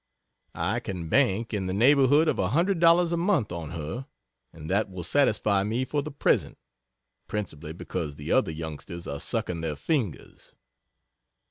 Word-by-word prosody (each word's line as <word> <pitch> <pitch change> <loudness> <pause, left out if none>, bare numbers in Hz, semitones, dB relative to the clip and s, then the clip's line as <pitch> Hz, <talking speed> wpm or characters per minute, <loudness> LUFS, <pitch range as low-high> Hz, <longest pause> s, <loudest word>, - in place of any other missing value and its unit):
I 100 +8 0
can 90 -8 -6
"bank" 115 - +2
in 95 -3 -1
the 90 - -2
neighborhood 140 +6 +5
of - - +1
$100 170 - +3
a 170 - +1
month 170 - +1
on 85 -3 -5
her, 85 - -5 0.4
and 80 -1 -10
that 100 +4 +1
will 90 -2 -7
satisfy 105 - +2
me 115 +5 -1
for 145 +2 -1
the 155 - -6
present 145 - 0 0.7
(principally 85 -7 -5
because 75 -2 -5
the 75 - -6
other - - +3
youngsters 80 +2 -7
are 70 - -4
sucking 85 +3 -2
their 80 -2 -2
fingers.) 115 - -3
105 Hz, 150 wpm, -27 LUFS, -, 0.7 s, neighborhood